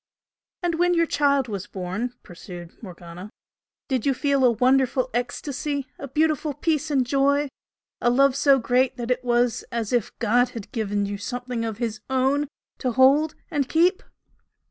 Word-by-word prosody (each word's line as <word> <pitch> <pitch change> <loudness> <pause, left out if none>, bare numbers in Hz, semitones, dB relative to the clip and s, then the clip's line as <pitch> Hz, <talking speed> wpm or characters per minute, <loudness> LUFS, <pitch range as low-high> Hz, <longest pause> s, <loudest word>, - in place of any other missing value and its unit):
"And 335 -2 0
when 355 0 +3
your 335 0 +3
child 280 -4 +2
was 205 -2 -5
born" 195 +7 -4
pursued 175 -1 -10
Morgana 180 -1 -10 0.6
"did 260 -5 -1
you 275 -2 +1
feel 280 0 +1
a 250 - +7
wonderful 255 +2 +2
ecstasy? 275 +3 -3
a 280 - -6
beautiful 305 +1 0
peace 310 0 0
and 270 -4 +2
joy? 280 +2 +2 0.5
a 240 - +3
love 270 +2 +4
so 280 -1 +5
great 250 +1 +1
that 240 0 -3
it 250 0 0
was 240 -1 +1
as 230 -1 -2
if 240 -4 +1
God 240 +2 +2
had 210 - -8
given 205 -5 -1
you 200 0 -4
something 245 +2 -4
of 225 -2 -3
His 225 -3 -3
Own 265 +3 +1 0.3
to 255 -3 -1
hold 280 +5 +4 0.2
and 280 -4 -1
keep?" 340 +8 +3
255 Hz, 165 wpm, -24 LUFS, 230-280 Hz, 0.6 s, a